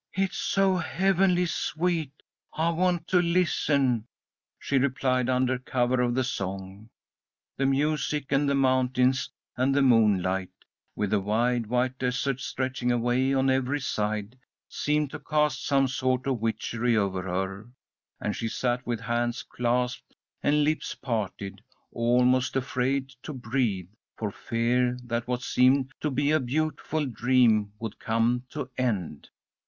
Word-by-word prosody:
"It's 195 0 -1
so 195 -1 +2
heavenly 180 +1 +2
sweet 165 -3 -2 0.3
I 165 +2 +1
want 175 0 0
to 180 -1 +4
listen," 145 -9 +1 0.5
she 140 - 0
replied, 130 -2 +1
under 130 0 +1
cover 125 -1 0
of 120 -1 +1
the 130 - +2
song. 95 -2 -5 0.7
The 135 - +1
music 150 0 0
and 140 0 +2
the 140 - +2
mountains 130 -1 +2 0.3
and 130 +2 +1
the 140 - +4
moonlight, 95 -6 +3 0.5
with 105 -2 -1
the 105 - +3
wide, 115 +3 0
white 125 +2 0
desert 130 +1 -1
stretching 130 -2 -2
away 120 +2 +1
on 135 0 +3
every 130 +2 0
side, 110 -2 -3 0.3
seemed 150 -1 -1
to - - -6
cast 150 -3 0
some 135 -1 +3
sort 130 0 -1
of 135 -3 0
witchery 115 +1 0
over 95 -3 0
her, 95 +4 -4 0.5
and 105 - -2
she 115 - -3
sat 125 +2 -1
with 120 -2 -2
hands 120 0 -1
clasped 125 +1 -2 0.3
and 150 +1 +3
lips 155 +1 -1
parted, 100 -5 -4 0.3
almost 125 +2 +2
afraid 135 +1 0
to 150 - -7
breathe, 110 -7 -2 0.3
for 105 -2 -3
fear 120 +3 0
that 120 0 -3
what 125 0 -2
seemed 130 +2 +3
to 150 - 0
be 145 +2 +1
a 155 - +4
beautiful 155 +3 -1
dream 115 -4 +2
would 115 -3 -6
come 115 +2 +1
to 145 -2 -5
end. 100 - -2
125 Hz, 140 wpm, -27 LUFS, 115-140 Hz, 0.7 s, to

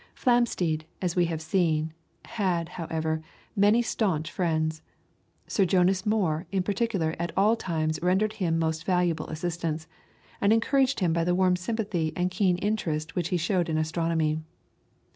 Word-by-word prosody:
Flamsteed, 190 - +1
as 180 -2 -1
we 175 -1 +3
have 160 -1 -3
seen, 160 -3 +1 0.3
had, 180 -6 -1
however, 160 -2 -2 0.3
many 210 +4 +4
staunch 175 -9 -1
friends. 160 -3 -1 0.6
Sir 200 - +1
Jonas 185 +1 +2
Moore 185 -6 +1
in 190 -2 +1
particular 195 -5 0
at 170 -1 -2
all 210 +4 +4
times 155 -6 -2
rendered 190 +5 +2
him 175 -6 0
most 160 0 -1
valuable 175 -4 +1
assistance, 160 -1 -3 0.6
and 200 - +4
encouraged 265 +3 +2
him 170 -3 +2
by 165 0 +1
the 175 +1 +1
warm 185 -1 +3
sympathy 185 -4 -2
and 180 +1 0
keen 185 -1 +2
interest 175 -6 -2
which 175 -2 0
he 180 - +1
showed 175 0 0
in 155 - 0
astronomy. 160 -1 0
175 Hz, 150 wpm, -27 LUFS, 160-195 Hz, 0.6 s, many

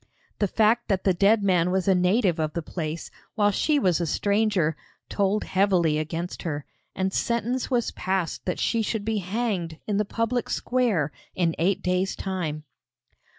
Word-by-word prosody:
The 205 - +2
fact 225 +4 +2
that 195 -3 0
the 190 - +3
dead 200 +4 +3
man 180 -3 +3
was 190 +1 0
a 195 - +6
native 180 0 +2
of 155 -1 -1
the 170 - -3
place, 160 -1 -5 0.2
while 205 -2 +3
she 295 +9 +2
was 180 - +2
a 170 - -1
stranger, 200 -4 +1 0.3
told 200 +1 +1
heavily 180 -5 +2
against 165 +3 -4
her, 150 -4 -4 0.3
and 190 0 -1
sentence 235 +2 -1
was 245 -3 +1
passed 185 -3 -2
that 180 - -1
she 230 - +1
should 215 -1 -2
be 220 -1 0
hanged 190 -4 -2
in 205 -2 -1
the 210 - +2
public 230 +3 -1
square 220 - +1 0.2
in 170 -3 +1
eight 190 +3 +1
days' 180 +1 0
time. 170 -6 -3
190 Hz, 170 wpm, -25 LUFS, 170-215 Hz, 0.3 s, a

